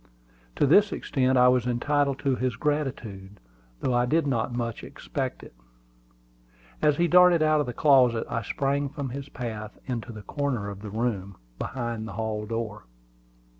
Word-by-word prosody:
To - - +3
this 200 +9 +5
extent 130 -2 +1
I 125 0 +6
was 125 -1 +3
entitled 140 +3 +1
to 135 -2 +2
his 125 -2 -1
gratitude, 115 -9 -3 0.4
though 130 - 0
I 120 0 +2
did 160 +4 +2
not 120 -4 0 0.3
expect - - -5
much - - -12
of - - -33
him. - - -28 1.2
As 150 -2 +3
he 175 - +3
darted 180 -2 +6
out 155 0 +3
of 145 - 0
the 125 - -4
closet, 125 -6 +4
I 115 - -2
sprang 140 +6 -1
from 140 -1 -5
his 140 +2 -7
path 110 -5 -6
into 120 -2 -4
the 105 -2 -9
corner 125 -4 -2
of 100 -1 -8
the 105 - -7
room, 100 -3 -2 0.2
behind 120 -3 -4
the - - -7
hall 110 -1 -3
door. 110 -2 -4
125 Hz, 170 wpm, -26 LUFS, 110-140 Hz, 1.2 s, I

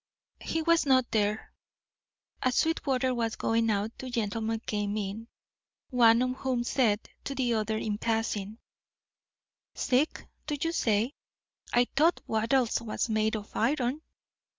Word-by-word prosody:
He 325 0 -2
was 335 -2 +3
not 260 -2 +3
there. 210 0 0 0.9
As 255 -1 +1
Sweetwater 265 -5 +1
was 230 -2 -1
going 225 0 +1
out 210 +1 0
two 260 - -6
gentlemen 225 -1 -1
came 210 -2 -2
in, 210 +2 -4 0.6
one 235 -1 +5
of 255 0 -2
whom 255 -3 -1
said 235 -4 +1 0.2
to 275 - -4
the 250 -3 +1
other 220 0 0
in 210 -1 -2
passing: 220 -2 -1 1.2
"Sick, 270 +3 0 0.2
do 295 - -1
you 330 - 0
say? 225 -3 +1 0.6
I 245 +1 +4
thought 320 +5 +4
Wattles 230 +2 +1
was 230 +1 -2
made 220 0 +1
of 210 -1 -7
iron." 260 +3 0
230 Hz, 135 wpm, -29 LUFS, 220-260 Hz, 1.2 s, one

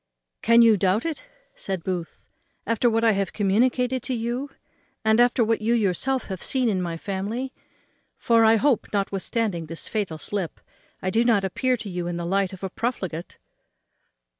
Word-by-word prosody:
"Can 230 +1 +6
you 225 -2 +6
doubt 195 - +1
it," 330 +10 -4 0.3
said 190 -4 -4
Booth, 180 -3 -4 0.4
"after 230 +1 +2
what 225 0 +1
I 225 - +5
have 195 -1 -1
communicated 250 +5 +1
to 255 - -3
you, 240 +4 -3 0.6
and 220 +1 +4
after 240 0 +4
what 225 0 +1
you 230 +2 +2
yourself 235 +5 0
have 190 -2 -6
seen 255 -3 0
in 190 -3 0
my 170 -2 -3
family? 210 +9 -4 0.6
for 230 -1 +3
I 220 0 +6
hope, 260 0 +2
notwithstanding 195 -2 -1
this 165 +1 -6
fatal 200 -8 -2
slip, 190 +1 -4 0.4
I 185 - 0
do 225 +4 +3
not 225 -5 +3
appear 255 +7 0
to 215 - -8
you 180 -2 -3
in 175 -1 -3
the 170 - -3
light 195 +1 +1
of 190 0 -11
a 190 - -2
profligate." 190 -8 -4
215 Hz, 175 wpm, -24 LUFS, 190-235 Hz, 0.6 s, Can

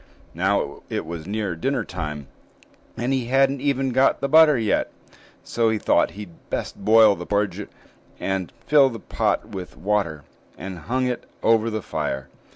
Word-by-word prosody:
Now 95 -4 -1
it - - -3
was 80 0 -7
near 100 -3 -2
dinner 130 - -1
time, 75 -3 -5 0.7
and 120 +3 -1
he 130 -3 0
hadn't 135 +2 +2
even 135 -2 0
got 130 +2 +3
the 140 - -1
butter 155 -1 +6
yet; 110 -3 0 0.5
so 115 -1 +1
he 110 - +1
thought - - +2
he'd 100 -5 -11
best - - -3
boil 110 -1 +6
the 90 0 -8
porridge, 100 0 -1 0.5
and 95 -2 -2
filled 140 -4 +5
the 115 - -7
pot - - -1
with 90 -2 -8
water, 95 -8 -1 0.3
and 95 0 -7
hung 130 +1 +1
it 125 -1 -3 0.2
over 115 0 +3
the 110 -2 -4
fire. 65 0 -3
110 Hz, 165 wpm, -23 LUFS, 90-130 Hz, 0.7 s, butter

